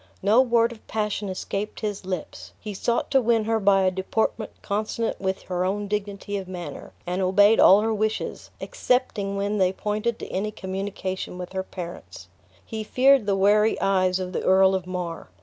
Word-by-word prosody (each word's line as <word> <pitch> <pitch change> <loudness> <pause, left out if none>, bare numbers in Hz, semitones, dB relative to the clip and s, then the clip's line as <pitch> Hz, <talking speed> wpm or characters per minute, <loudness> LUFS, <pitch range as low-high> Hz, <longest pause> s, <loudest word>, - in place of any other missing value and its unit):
No 215 +5 +5
word 235 -2 +2
of 230 - -13
passion 210 -2 -2
escaped 195 +2 -4
his 205 -3 -4
lips; 185 -4 -6
he 210 -2 -6
sought 235 +4 -1
to 265 - +4
win 230 -2 +2
her 225 +1 0
by 195 -1 +4
a 185 - +3
deportment 215 +4 -1
consonant 215 +2 -2
with 190 0 -2
her 180 -1 -2
own 200 +2 -1
dignity 205 0 -3
of 190 -2 -6
manner, 180 -2 -7
and 180 +2 -2
obeyed 205 +4 +5
all 195 +2 +7
her 225 +1 0
wishes, 215 +1 -2
excepting 245 - -1
when 200 +1 -1
they 185 -1 +3
pointed 210 +4 -2
to - - -8
any 200 +3 -1
communication 190 -2 -5
with 180 0 -7
her 190 - -1
parents. 180 -2 -9 0.4
He 220 -2 -5
feared 260 +1 +4
the 200 - +2
wary 210 +3 +3
eyes 185 -1 +2
of 185 0 -5
the - - -1
Earl 190 0 +4
of 185 -1 -2
Mar. 180 - -5
200 Hz, 185 wpm, -24 LUFS, 190-215 Hz, 0.4 s, all